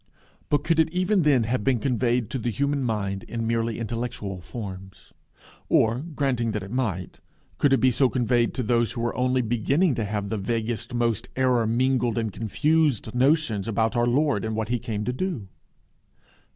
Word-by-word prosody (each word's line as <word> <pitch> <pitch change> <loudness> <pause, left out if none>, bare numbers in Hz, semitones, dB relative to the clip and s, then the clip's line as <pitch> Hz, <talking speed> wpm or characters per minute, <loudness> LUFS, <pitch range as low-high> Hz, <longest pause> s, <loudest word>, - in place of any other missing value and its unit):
But 145 -1 +2
could 165 0 +1
it 160 0 +4
even 185 +3 +1
then 145 -6 +4
have 120 0 -1
been 130 0 +2
conveyed 120 -2 0
to 135 - -2
the 120 - -1
human 140 +4 0
mind 100 -5 -2
in 115 -1 -4
merely 115 0 0
intellectual 115 -4 -4
forms? 95 -4 -9 0.6
Or, 115 +2 +3
granting 135 -7 -1
that 105 -2 -3
it 95 - -9
might, 110 -9 -2 0.4
could 145 - +3
it 135 - +5
be 130 - +4
so 125 +2 +3
conveyed 120 -2 +1
to 125 - -1
those 120 +1 +1
who 120 - -4
were 120 0 -1
only 125 0 +1
beginning 135 - +1
to 115 -3 -2
have 100 -1 -3
the 110 - -2
vaguest, 115 +3 -2
most 115 -1 0
error 125 -3 +2
mingled 125 0 +1
and 110 -3 -1
confused 145 - +1
notions 125 -5 +2
about 115 +1 0
our 120 0 +2
Lord 135 -3 +2
and 110 0 -2
what 110 0 -2
he 120 0 0
came 105 -2 -4
to 125 - -1
do? 130 - -3
120 Hz, 185 wpm, -25 LUFS, 110-130 Hz, 0.6 s, it